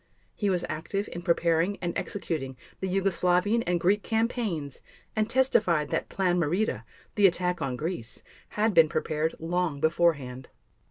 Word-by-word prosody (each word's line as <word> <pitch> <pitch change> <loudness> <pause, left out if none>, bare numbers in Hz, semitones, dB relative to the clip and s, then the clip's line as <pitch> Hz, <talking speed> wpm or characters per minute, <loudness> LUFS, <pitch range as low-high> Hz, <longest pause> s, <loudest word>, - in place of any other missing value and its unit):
He 205 - -1
was 180 -2 0
active 195 +6 -3
in 175 - -6
preparing 170 +2 +1
and 175 -1 -3
executing 150 -9 -4 0.2
the 190 - -2
Yugoslavian 190 +3 +2
and 175 -1 +1
Greek 195 +5 +2
campaigns, 220 - -2 0.3
and 215 0 +1
testified 210 - +2
that - - -2
"Plan 180 -2 +1
Marita," 175 +7 0 0.3
the 205 -2 +6
attack 180 0 -1
on 130 -2 -1
Greece, 150 -4 -5 0.3
had 215 +1 +2
been 165 -3 +6
prepared 155 +1 -1
long 165 -2 -1
beforehand. 145 -6 +1
175 Hz, 145 wpm, -27 LUFS, 160-200 Hz, 0.3 s, the